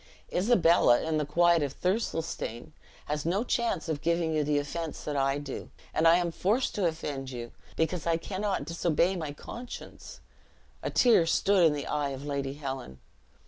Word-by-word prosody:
Isabella, 175 - +4
in 160 -1 0
the 150 - -2
quiet 170 +1 +4
of 140 -2 -3
Thirlestane, 165 - -2 0.3
has 150 0 -2
no 185 +7 +1
chance 235 -8 -1
of 155 -3 -2
giving 170 0 +1
you 155 -1 +2
the 145 0 +1
offense 155 +3 -4
that 150 - -3
I 135 0 +1
do; 145 -2 -6 0.2
and 160 - +3
I 165 - +7
am 175 -1 0
forced 215 +10 0
to 195 -4 +1
offend 145 -5 -4
you, 120 -2 -6 0.2
because 160 0 -1
I 165 -1 +3
cannot 195 +4 -2
disobey 170 +2 +1
my 155 -5 -4
conscience." 235 - -9 0.6
A - - -2
tear 230 -9 +4
stood 195 +2 +3
in 155 - +2
the 145 -1 -4
eye 145 -1 -1
of 135 +1 -6
Lady 140 -1 -3
Helen. 135 - -6
160 Hz, 175 wpm, -29 LUFS, 145-175 Hz, 0.6 s, I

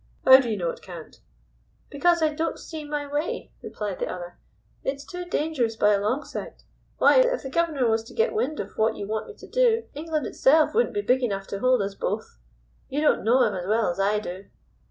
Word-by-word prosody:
"How 260 0 +10
do 250 -3 -2
you 215 - -1
know 170 -3 -1
it - - -12
can't?" 170 -4 -11 0.7
"Because 340 +3 +2
I 310 -1 +2
don't 325 +2 -2
see 315 -2 -8
my 295 0 -3
way," 290 +3 -3
replied 205 -3 -5
the - - -2
other. 175 0 -8 0.4
"It's 280 +1 -3
too 360 +3 -6
dangerous 295 -9 -1
by 210 -1 +4
a 200 - +1
long 245 +8 0
sight. - - -8 0.3
Why, - - +5
if - - +2
the 270 - -6
guv'nor 315 -7 +1
was 225 0 +1
to - - -13
get 460 +2 +1
wind 430 -9 -1
of - - -7
what 220 +1 +2
you 200 - -5
want 215 +1 -3
me 435 - -10
to - - -13
do, 470 -2 +2
England 310 -1 -3
itself 305 +4 +3
wouldn't 465 -1 +1
be 410 - +1
big 260 -5 +2
enough 195 -5 -2
to 200 - -4
hold 255 -2 +3
us 195 0 -4
both. - - -4 0.5
You 280 - -2
don't 305 - +2
know 245 +4 +4
'im - - 0
as 180 0 -5
well 220 -2 +2
as 175 - -7
I 200 +2 +2
do." 195 -2 -6
265 Hz, 225 wpm, -25 LUFS, 210-315 Hz, 0.7 s, How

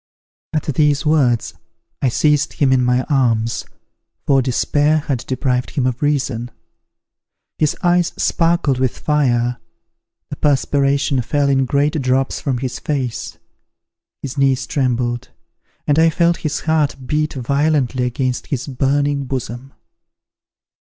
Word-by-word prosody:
At 155 - 0
these 150 +1 +1
words, 135 -7 +2 0.5
I 130 - +2
seized 150 +3 +1
him 135 -2 +2
in 130 -1 +3
my 125 +1 +2
arms, 115 -6 0 0.6
for 135 -1 +4
despair 145 +4 +1
had 140 -4 -2
deprived 125 -1 -1
him 135 - -1
of 125 -1 -2
reason. 140 -5 -1 1.1
His 155 -1 +1
eyes 175 -1 +3
sparkled 165 -6 +1
with 130 -2 0
fire, 125 -5 +1 0.7
the - - -5
perspiration 140 -1 +1
fell 140 +3 0
in 135 -1 +2
great 145 +3 +1
drops 130 +1 0
from 135 -4 -1
his 130 0 -4
face; 135 -6 -3 0.9
his 140 0 -5
knees 135 -1 +2
trembled, 120 -3 -1 0.6
and 145 +1 +2
I 165 0 +5
felt 170 +1 +2
his 155 -2 -3
heart 155 -2 +1
beat 150 +2 -1
violently 135 -1 0
against 125 0 -2
his 130 -2 -3
burning 140 +1 0
bosom. 130 0 -5
135 Hz, 125 wpm, -18 LUFS, 125-150 Hz, 1.1 s, I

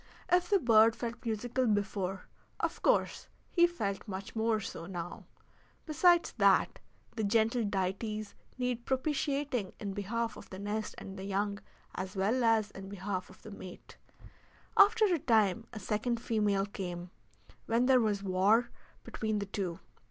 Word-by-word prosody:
If 355 0 +3
the 405 - +5
bird 225 - +5
felt 235 -1 -5
musical 240 +3 -1
before, 200 -3 -1 0.4
of - - -2
course - - +1 0.2
he 345 -1 +5
felt 210 - -4
much 195 +1 -6
more 220 0 +1
so 170 -5 -6
now. 175 -2 -6 0.6
Besides 345 +2 +4
that, - - +4 0.4
the 220 - -2
gentle 225 +3 +2
deities 200 +2 -2 0.2
needed 250 -2 -2
propitiating 270 -5 -1
in 200 -2 -4
behalf 225 +3 -2
of - - -12
the 185 - -8
nest 205 +2 -3
and 195 0 -8
young 200 +1 -2 0.3
as 190 +2 -5
well 215 +7 +1
as 220 -2 +3
in 195 0 -9
behalf 190 -1 -4
of 185 - -17
the 215 - -9
mate. 185 -2 -11 0.8
After 430 +2 +6
a 355 -5 +2
time 225 -3 +2
a 220 - -7
second 215 +4 -1
female 210 -4 +1
came, 180 -3 -6 0.6
when 230 +2 +2
there 255 -1 +5
was 205 -3 0
war 200 +5 +3 0.3
between 220 -1 -2
the 200 - -2
two. 190 -4 -4
215 Hz, 150 wpm, -32 LUFS, 195-240 Hz, 0.8 s, After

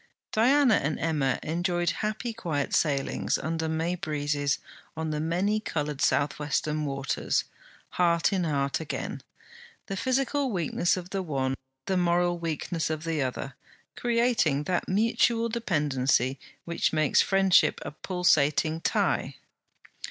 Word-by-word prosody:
Diana 250 +1 +4
and 150 +2 -2
Emma 145 -5 +1
enjoyed 175 +1 0
happy 215 +2 -2
quiet 160 -10 -2
sailings 140 -4 +1
under 160 +1 -2
May 160 +2 -1
breezes 145 -4 -1 0.4
on 160 -1 -2
the 150 - -2
many 180 +7 0
coloured 150 -8 -3
South 145 +1 +1
western 150 +1 -1
waters, 135 -1 -1 0.5
heart 170 +1 +2
in 185 -2 +1
heart 140 -4 0
again; 160 - -5 0.6
the 195 - -4
physical 265 +4 0
weakness 175 -1 0
of 180 +1 -7
the 195 - -1
one, 135 -6 -1 0.3
the 190 - 0
moral 175 0 +2
weakness 165 0 -2
of 155 0 -3
the 165 -3 -1
other, 130 +1 -3 0.4
creating 235 - +1
that 180 +3 -1
mutual 230 +3 +2
dependency 140 - +1 0.3
which 170 0 0
makes 155 -2 +3
friendship 195 -1 +4
a - - -5
pulsating 160 -2 +1
tie. - - 0
165 Hz, 130 wpm, -27 LUFS, 150-195 Hz, 0.6 s, Diana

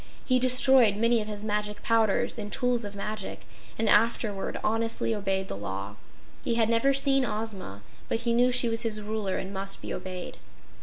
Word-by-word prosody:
He 255 -1 +3
destroyed 255 -3 +5
many 230 +2 +2
of 210 - -6
his 210 -1 -6
magic 210 -1 -3
powders 225 -1 +1
and 205 -1 -5
tools 245 -1 0
of 205 -1 -7
magic, 210 0 -6 0.3
and 225 - -1
afterward 210 -2 +1
honestly 225 +1 +1
obeyed 195 -2 -2
the - - -5
law. 100 +1 -6 0.5
He 235 - 0
had 225 -1 +2
never 230 +4 +3
seen 275 0 +2
Ozma, 210 - -5 0.3
but 225 - -1
he 235 -1 0
knew 245 +2 +3
she 245 -1 +4
was 225 0 0
his 220 -2 -1
Ruler 210 -2 -3
and 190 +1 -5
must 195 0 -3
be - - -6
obeyed. 185 -1 -7
215 Hz, 185 wpm, -27 LUFS, 200-235 Hz, 0.5 s, destroyed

